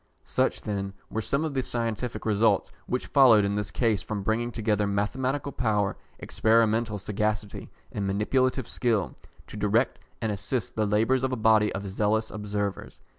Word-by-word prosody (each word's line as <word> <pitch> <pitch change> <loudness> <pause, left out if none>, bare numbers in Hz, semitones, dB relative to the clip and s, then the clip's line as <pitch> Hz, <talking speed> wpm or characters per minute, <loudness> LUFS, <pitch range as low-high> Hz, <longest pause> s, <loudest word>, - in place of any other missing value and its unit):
Such, - - 0
then, 100 -2 -3 0.2
were 110 - -1
some 140 +8 0
of 155 - -3
the 135 - +1
scientific 115 -2 -3
results 105 -2 +2 0.2
which 125 - -1
followed 120 -7 +6
in 100 - 0
this 105 -1 -2
case 115 -5 +1
from 105 -2 -4
bringing 115 +3 0
together 105 -3 0
mathematical 130 +8 -1
power, 105 -6 0 0.2
experimental 110 -1 +2
sagacity, 105 +1 -3 0.2
and 100 -1 -2
manipulative 130 +5 +1
skill, 105 - 0 0.3
to - - -10
direct 105 +5 +1 0.2
and 110 -3 -1
assist 105 +5 -3
the 110 -1 +1
labours 115 +5 +2
of 130 - 0
a - - 0
body 110 -2 +4
of 100 +1 -4
zealous 110 +3 0
observers. 105 -1 -4
110 Hz, 160 wpm, -27 LUFS, 105-120 Hz, 0.3 s, followed